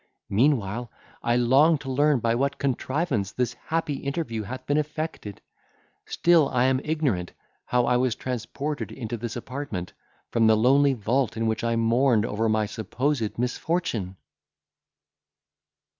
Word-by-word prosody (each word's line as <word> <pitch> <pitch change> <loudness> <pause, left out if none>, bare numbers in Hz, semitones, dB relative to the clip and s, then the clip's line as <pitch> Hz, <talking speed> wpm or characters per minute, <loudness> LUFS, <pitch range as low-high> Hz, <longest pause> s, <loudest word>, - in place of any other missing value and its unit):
—Meanwhile, 120 -1 +1 0.3
I 120 - +1
long 135 +7 +4
to 135 -1 -6
learn 145 -1 +3
by 115 0 +2
what 140 +4 0
contrivance 130 - -1
this 125 -1 -1
happy 160 +2 -2
interview 140 -6 -3
hath 130 +5 -7
been 145 - +1
effected. 150 -8 -5 0.7
Still 170 -4 +3
am 130 +1 +2
I - - -9
ignorant 140 - -1 0.3
how 125 -1 +2
I 125 - +3
was 125 -3 +1
transported 135 +5 -4
into 120 -3 -5
this 115 0 -5
apartment, 120 -7 -5 0.4
from 115 -1 +3
the 110 0 +5
lonely 135 +4 +4
vault 120 +3 0
in 115 - 0
which 110 +1 -1
I 115 0 +1
mourned 115 0 +3
over 110 +1 0
my 110 0 +2
supposed 115 +3 -2
misfortune!" 120 - -2
125 Hz, 140 wpm, -25 LUFS, 115-140 Hz, 0.7 s, the